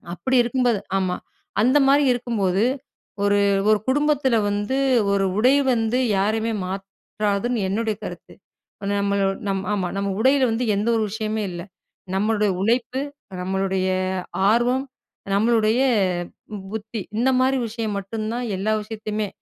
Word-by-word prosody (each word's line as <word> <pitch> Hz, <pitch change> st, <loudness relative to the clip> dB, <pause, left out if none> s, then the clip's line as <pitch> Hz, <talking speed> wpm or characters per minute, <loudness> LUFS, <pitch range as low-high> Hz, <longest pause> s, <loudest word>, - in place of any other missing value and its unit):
அப்படி 260 Hz, +7 st, -1 dB
இருக்கும்போது 240 Hz, -3 st, +1 dB, 0.2 s
ஆமா. 185 Hz, -1 st, -1 dB, 0.5 s
அந்த 255 Hz, +5 st, +4 dB
மாதிரி 285 Hz, +2 st, +5 dB
இருக்கும்போது, 215 Hz, -5 st, 0 dB, 0.6 s
ஒரு 205 Hz, 0 st, +3 dB, 0.3 s
ஒரு 215 Hz, -1 st, +4 dB
குடும்பத்தில 285 Hz, -3 st, +2 dB
வந்து, 205 Hz, +6 st, -1 dB, 0.4 s
ஒரு 195 Hz, -1 st, +2 dB
உடை 255 Hz, +5 st, +5 dB, 0.2 s
வந்து, 225 Hz, +1 st, 0 dB, 0.2 s
யாரையுமே 220 Hz, +3 st, 0 dB
மாற்றாதுன்னு 200 Hz, +3 st, -2 dB
என்னுடைய 220 Hz, +1 st, -1 dB
கருத்து. -, -, -9 dB, 0.5 s
ப்ப -, -, -2 dB
நம்மள 200 Hz, 0 st, +1 dB, 0.2 s
நம் 195 Hz, -1 st, 0 dB
ஆமா, 190 Hz, -3 st, -1 dB
நம்ம 200 Hz, 0 st, -1 dB
உடையில 265 Hz, +3 st, +4 dB
வந்து, 225 Hz, +3 st, -1 dB
எந்த 205 Hz, +3 st, -1 dB
ஒரு 225 Hz, -, +1 dB
விஷயமே 215 Hz, 0 st, -2 dB
இல்லை. 175 Hz, 0 st, -6 dB, 0.5 s
நம்மளுடைய 210 Hz, +1 st, +1 dB
உழைப்பு, 240 Hz, +4 st, 0 dB, 0.4 s
நம்மளுடைய 190 Hz, 0 st, -1 dB, 0.6 s
ஆர்வம், 245 Hz, +3 st, +2 dB, 0.5 s
நம்மளுடைய 220 Hz, +3 st, +3 dB, 0.9 s
புத்தி, 220 Hz, 0 st, -5 dB, 0.2 s
இந்த 260 Hz, +3 st, +3 dB
மாதிரி 260 Hz, +1 st, +3 dB
விஷயம் 220 Hz, -1 st, -3 dB
மட்டும் 215 Hz, +3 st, -5 dB
தான், 245 Hz, 0 st, -2 dB
எல்லா 210 Hz, +3 st, 0 dB
விஷயத்தயுமே 215 Hz, -1 st, -4 dB
220 Hz, 125 wpm, -23 LUFS, 200-240 Hz, 0.9 s, மாதிரி